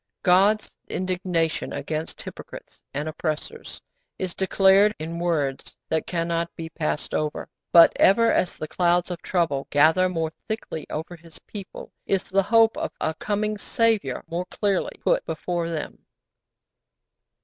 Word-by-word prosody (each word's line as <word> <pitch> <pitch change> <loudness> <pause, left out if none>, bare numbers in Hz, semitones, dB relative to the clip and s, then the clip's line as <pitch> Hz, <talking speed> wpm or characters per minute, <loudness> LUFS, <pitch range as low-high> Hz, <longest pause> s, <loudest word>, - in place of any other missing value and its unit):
God's 200 +4 +4 0.2
indignation 180 -3 -1
against 155 0 -4
hypocrites - - -10
and 145 +2 -3
oppressors 155 -1 -4 0.4
is 185 -2 -3
declared 195 +2 +4
in 165 +2 -5
words 150 -6 -2
that 160 0 0
cannot 170 -1 -1
be 165 -1 -6
passed 155 -2 -3
over; 150 -1 -2 0.2
but 170 -1 +8
ever 230 +4 +5
as 180 - 0
the 155 - -5
clouds 175 +2 +1
of 175 - -5
trouble 165 -7 0
gather 160 +6 +4
more 165 -3 -2 0.2
thickly 215 -7 -5
over 160 +3 -5
His 165 -1 -15
people 200 -3 -9 0.2
is 195 -1 +1
the 195 +1 +4
hope 225 +2 +4
of - - -3
a 160 - -1
coming 210 +4 -2
Saviour 215 - 0
more 170 +2 -3
clearly 200 0 -1
put - - +2
before 170 +1 -3
them. 160 -3 -5
175 Hz, 140 wpm, -24 LUFS, 160-195 Hz, 0.4 s, but